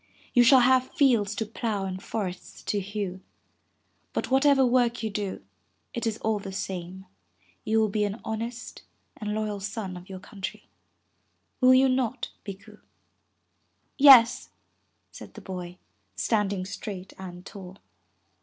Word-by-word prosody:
You 245 - +6
shall 255 +1 +7
have 255 +1 +4
fields 225 -7 +3
to 220 - -2
plow 215 -2 -3
and 185 0 -5
forests 190 -5 -5
to 205 - -1
hew. 195 -2 -4 0.9
But - - -3
what 270 +2 +4
ever 275 -2 +5
work 240 -2 +2
you 220 - -2
do, 200 - -4 0.5
it 235 -1 -2
is 220 -1 -1
all 220 -1 0
the 195 -1 -7
same, 190 0 -6 0.6
you 220 +1 +2
will 220 - +3
be 210 +1 0
an 205 +2 -2
honest 230 +2 -5 0.4
and 210 -1 -3
loyal 215 -2 -2
son 195 -1 -5
of 180 +2 -11
your 190 - -7
country. 195 0 -8 0.9
Will 255 0 +6
you 265 +1 +5
not, 255 -1 -1
Bikku?' 200 -2 -10 1.2
Yes,'' 260 -5 +7 0.6
said - - -12
the - - -8
boy, 180 -2 -7 0.4
standing 200 -4 0
straight 195 -1 -7
and 180 -1 -9
tall. 190 -1 -10
210 Hz, 145 wpm, -27 LUFS, 190-235 Hz, 1.2 s, shall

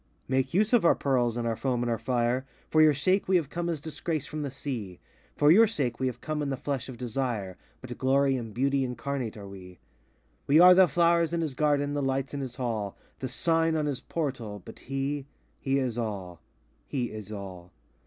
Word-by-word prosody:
93 130 - +1
Make 130 +4 0
use 215 +4 +3
of 240 - +5
our 170 - +5
pearls, 120 -4 +1
and 120 -1 -1
our 115 - 0
foam, 125 0 -1
and 120 - -1
our 115 - -1
fire; 125 0 0 0.3
For 155 - +5
your 155 -2 +6
sake 185 +8 +1
we 190 - +3
have 160 -6 +1
come 175 0 -2
as 165 -3 -2
Disgrace 155 0 -3
from 155 +2 -5
the 145 - -3
Sea;— 120 -9 -5 0.4
For 145 +1 +5
your 220 +6 +7
sake 130 - -2
we 130 - +1
have 125 -1 -5
come 155 -1 -3
in 145 - -1
the 135 - -2
flesh 135 -2 -3
of 125 - -8
Desire, 120 -6 -3 0.3
But 125 -1 -7
glory 135 +1 +3
and 115 -3 -5
beauty 135 +4 +1
incarnate 125 -2 -3
are 100 -1 -9
we. 90 -2 -11 0.7
We 145 +3 +6
are 180 +1 +10
the 185 0 +6
flowers 170 +1 +2
in 170 - 0
his 155 -4 -2
Garden, 145 0 +1
the 145 - -1
lights 135 0 -1
in 140 - -3
his 130 -3 -5
Hall, 110 -6 -3 0.2
The 130 - -3
sign 165 +4 +1
on 155 -1 0
his 140 -3 -2
Portal, 120 - -4
but - - -11
he, 135 +1 -3 0.3
he 135 0 0
is 125 -3 -1
all,—he 105 - -6
is 110 -1 -8
all! 95 -4 -8
135 Hz, 215 wpm, -28 LUFS, 120-150 Hz, 0.7 s, are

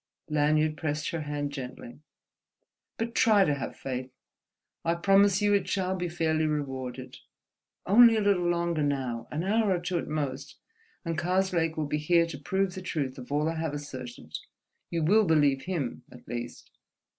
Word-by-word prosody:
Lanyard 155 +1 +2
pressed 150 +1 -2
her 165 -2 -3
hand 145 -1 -3
gently. 130 -2 -8 1.0
"But 230 +1 -3
try 210 -4 +5
to 150 - +2
have 140 - -5
faith; 130 -1 -5 0.7
I 165 +1 +1
promise 195 +2 +4
you 205 0 +4
it 200 -2 +1
shall 190 -1 0
be 180 -1 -3
fairly 160 -2 0
rewarded. 130 -4 -4 0.7
Only 230 +4 +7
a 220 - +1
little 190 -4 +2
longer 170 -2 0
now, 130 -5 -2
an 155 +3 -3
hour 215 +2 +2
or 180 - +2
two 175 0 -2
at - - -5
most, 140 -2 -3 0.5
and 165 -1 -2
Karslake 175 -2 +1
will 155 - 0
be 150 +1 -1
here 170 +2 +3
to 160 -4 -7
prove 190 +5 -1
the 185 - -6
truth 140 -8 -3
of 125 +2 -10
all 150 +2 +1
I 165 0 -2
have 160 -2 -2
asserted. 125 - -7 0.5
You 165 -1 -1
will 210 +7 +4
believe 145 -5 +3
him, 170 -11 -3
at 125 - -15
least." 120 0 -6
155 Hz, 170 wpm, -28 LUFS, 140-180 Hz, 1.0 s, Only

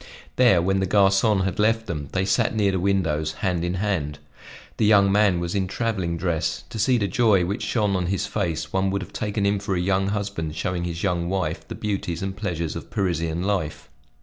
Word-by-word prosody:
There, 115 -9 +5
when 95 +1 +1
the 95 - 0
garcon 100 +1 +3
had 95 +3 -2
left 115 +1 +2
them, 75 -8 -5
they 95 0 0
sat 110 +3 +1
near 100 -2 +2
the 95 - -1
windows, 80 -5 0
hand 90 -3 0
in 90 +1 -1
hand. 90 -7 -1 0.6
The 110 - +2
young 100 -2 +5
man 100 -3 +3
was 85 0 -3
in 95 -2 0
traveling 95 -5 -2
dress; 85 -2 -1
to 115 - -5
see 125 +4 +3
the 100 -3 0
joy 110 -7 +3
which 100 +5 -3
shone 105 -4 0
on 90 -2 -1
his 95 +1 -1
face, 90 -7 -3
one 95 0 +1
would 100 0 -1
have - - -13
taken 105 -1 -1
him 100 0 +2
for 100 -1 -2
a - - 0
young 95 +2 +1
husband 100 -6 -3
showing 90 -1 -2
his 85 -1 -4
young 85 -3 0
wife 80 -4 -2
the - - -6
beauties 95 -5 -3
and 95 0 -3
pleasures 85 -6 -3
of - - -7
Parisian 85 -3 -1
life. 95 -7 -2
95 Hz, 215 wpm, -24 LUFS, 85-100 Hz, 0.6 s, There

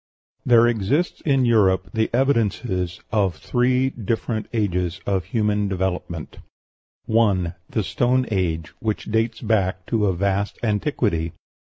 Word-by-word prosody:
There 120 -1 +6
exist 120 - 0
in 135 -3 +3
Europe 95 -5 +3
the 110 -1 +1
evidences 115 -8 0
of 100 -5 +1
three 125 +1 +1
different 110 -1 -3
ages 90 -5 -1
of 95 -3 0
human 105 0 0
development: 90 -4 -3 0.7
1. 100 -6 +2 0.2
The 110 - -1
Stone 125 +6 +1
Age, 80 -6 -1
which 110 -2 -2
dates 115 +1 0
back 95 -5 0
to 110 -3 +1
a 95 - +1
vast 100 +2 -1
antiquity. 105 - 0
105 Hz, 125 wpm, -22 LUFS, 95-115 Hz, 0.7 s, There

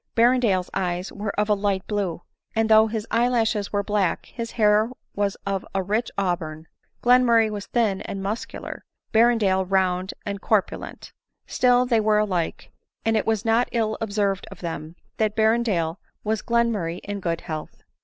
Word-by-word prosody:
Berrendale's 230 -6 +3
eyes 180 -1 -2
were 205 +1 -4
of 210 - +2
a 210 - +4
light 200 -2 -1
blue; 195 -5 -2 0.3
and 225 0 +2
though 220 0 +7
his 220 -1 -3
eye 235 +2 +3
lashes 225 -4 0
were 205 -1 0
black, 205 -3 0
his 230 -1 -6
hair 215 0 +3 0.2
was 200 -1 -1
of 195 -1 -1
a 190 - +1
rich 215 +5 0
auburn: 165 -5 -2 0.4
Glenmurray 240 -3 +5
was 205 -1 -5
thin 220 -5 +1
and 195 -1 -5
muscular; 210 +4 -5 0.3
Berrendale, 220 -5 +4
round 185 0 0
and 200 -1 -4
corpulent: 215 -4 -1 0.3
still 250 0 +3
they 235 -3 +2
were 215 0 +3
alike; 185 -6 -1 0.3
and 225 0 +2
it 215 - 0
was 220 0 0
not 225 +2 +3
ill 220 -2 0
observed 200 -3 -1
of - - -12
them, 165 -1 -5 0.2
that 215 -1 +1
Berrendale 220 -7 +1 0.3
was 215 0 -1
Glenmurray 225 -8 0
in 205 0 -4
good 170 -3 -2
health. 155 -3 -7
210 Hz, 165 wpm, -24 LUFS, 190-225 Hz, 0.4 s, though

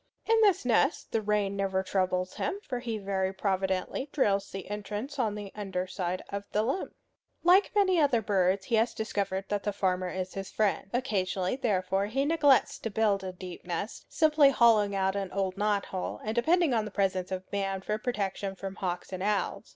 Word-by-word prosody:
In 450 0 +4
this 390 - +4
nest 250 +5 +2
the 225 - +1
rain 205 -1 0
never 190 -1 0
troubles 185 -1 0
him, 395 - -2
for 250 -2 -2
he 235 -3 -3
very 195 -2 -1
providently 190 +6 -1
drills 200 -8 +1
the 195 -1 -7
entrance 210 +7 -5
on 220 -4 +1
the 205 -2 -7
under 190 -3 -3
side 185 -1 -3
of 200 0 -4
the 210 - +2
limb. 270 +12 -2 0.5
Like 365 +4 +5
many 375 -4 +4
other 280 -6 +4
birds, 195 -2 +1
he 235 - +1
has 225 +1 +1
discovered 200 -3 -2
that 205 -1 0
the 205 - -1
farmer 185 -2 0
is 185 0 -4
his 195 -1 -5
friend. 200 -3 0
Occasionally, 195 -6 -1
therefore, 195 -6 0
he 270 +6 0
neglects 295 -4 +3
to 225 - -3
build 205 -2 +1
a 185 - -4
deep 180 -1 -9
nest, 175 +5 -5
simply 305 -3 +5
hollowing 220 -6 +4
out 190 0 +1
an 195 -2 -3
old 190 -1 -1
knot 205 0 +1
hole, 185 -1 -4
and 215 - -2
depending 320 +5 +3
on 220 -2 +1
the - - -5
presence 190 -2 -1
of 185 0 -3
man 195 -1 -1
for 210 +2 -2
protection 200 -4 -2
from 195 +1 -7
hawks 180 0 -4
and 185 - -4
owls. 205 0 -1
200 Hz, 195 wpm, -29 LUFS, 190-230 Hz, 0.5 s, Like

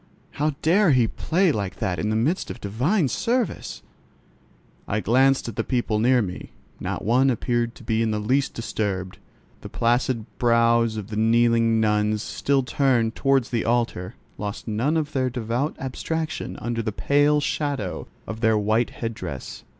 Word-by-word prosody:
How 150 0 -1
dare 175 0 +4
he 125 -3 +4
play 175 - +1
like 100 -8 -3
that 90 -2 -2
in 105 - -1
the 110 - 0
midst 145 - 0
of - - -7
divine 135 - +1
service? 230 - -2 1.0
I 105 - 0
glanced 130 +5 +3
at 115 - -6
the - - +1
people 120 -4 0
near 125 +1 +4
me: 90 -2 -7 0.3
not - - -4
one 125 +5 +4
appeared 120 -1 -1
to - - -14
be 110 0 0
in 115 - +1
the 105 - -1
least 130 +7 0
disturbed. 100 -5 -3 0.4
The - - -8
placid 120 -1 0
brows 115 -1 +3
of 105 -1 -6
the 105 - -4
kneeling 115 0 +3
nuns, 105 0 +1
still 140 -1 0
turned 125 -4 +1
towards 135 -3 +1
the 120 -2 0
altar, 115 -5 -1 0.2
lost 105 +2 -5
none 120 +9 0
of 155 -1 -2
their 130 -3 0
devout 125 +4 -2
abstraction 155 +4 -4
under 120 -1 -2
the 110 -1 -2
pale 145 +6 +3
shadow 140 - -2 0.2
of 110 +2 -6
their 110 -2 +3
white 110 +3 +1
head 115 -1 -5
dress. 70 -12 -7
115 Hz, 165 wpm, -24 LUFS, 110-135 Hz, 1.0 s, dare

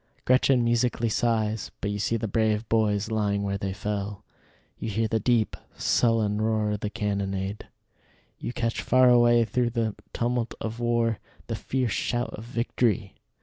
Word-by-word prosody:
Gretchen 130 0 +4
musically 120 0 +1
sighs, 110 -2 0
but 100 - -2
you 105 - -3
see 115 +3 0
the 110 - -3
brave 110 +1 +1
boys 110 -1 +1
lying 100 -2 0
where 100 0 -2
they 95 0 -2
fell: 100 0 -4 0.6
you 115 - -3
hear 110 +2 0
the 110 +1 0
deep, 115 0 +1 0.2
sullen 110 -3 +2
roar 110 -1 +1
of 105 - -2
the 105 - -3
cannonade; 100 -1 -3 0.7
you - - -4
catch 115 -2 -2
far 130 0 +5
away 120 -1 +5
through 120 +1 0
the 115 -2 -1 0.2
tumult 120 0 -1
of 110 +1 -5
war 120 -2 +1 0.3
the - - -3
fierce 125 -3 -1
shout 120 0 -1
of 105 - -7
victory. 115 -4 0
110 Hz, 160 wpm, -26 LUFS, 105-120 Hz, 0.7 s, far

